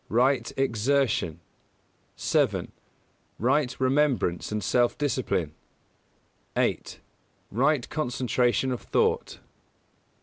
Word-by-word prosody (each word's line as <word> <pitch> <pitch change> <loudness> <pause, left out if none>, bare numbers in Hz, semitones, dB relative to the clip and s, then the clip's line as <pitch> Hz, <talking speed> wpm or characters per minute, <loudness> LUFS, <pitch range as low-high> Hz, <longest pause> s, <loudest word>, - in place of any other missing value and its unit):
Right 120 +1 +2
Exertion; 125 - +1 0.7
7. - - 0 0.7
Right 130 +2 +1
Remembrance 130 - +1
and 105 -1 -2
Self 120 +5 +2
discipline; 100 - -1 1.0
8. - - -1 0.5
Right 135 +4 +2
Concentration 125 -3 0
of 125 - -3
Thought. - - 0
125 Hz, 75 wpm, -26 LUFS, 115-135 Hz, 1.0 s, Right